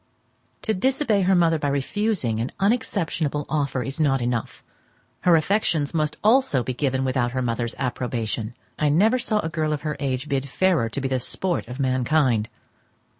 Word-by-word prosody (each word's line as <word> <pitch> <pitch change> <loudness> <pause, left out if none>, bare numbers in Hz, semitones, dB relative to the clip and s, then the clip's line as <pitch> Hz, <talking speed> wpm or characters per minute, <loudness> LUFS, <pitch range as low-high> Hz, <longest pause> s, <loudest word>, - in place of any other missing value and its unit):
To 220 - +1
disobey 235 0 +1
her 190 +1 +3
mother 165 -2 +3
by 145 - -1
refusing 140 - -1
an 120 +3 -2
unexceptionable 170 - 0
offer 140 -4 -1
is 135 +4 -5
not 135 -3 +2
enough; 120 -1 -3 0.6
her 175 -2 +4
affections 160 -3 +1
must 155 -2 -1
also 220 - +3
be 130 - -3
given 135 0 -1
without 125 -2 0
her 130 - -1
mother's 115 -1 -2
approbation. 120 -3 -3 0.2
I 150 - +2
never 215 - +3
saw 215 -3 +1
a - - -3
girl 155 -1 -1
of 150 - -3
her 150 -1 -3
age 135 0 -2
bid 140 -1 -2
fairer 170 -6 +2
to 135 - -4
be 135 - -1
the 130 -1 0
sport 175 +4 -2
of 125 +3 -8
mankind. 130 -3 +1
145 Hz, 175 wpm, -24 LUFS, 130-175 Hz, 0.6 s, her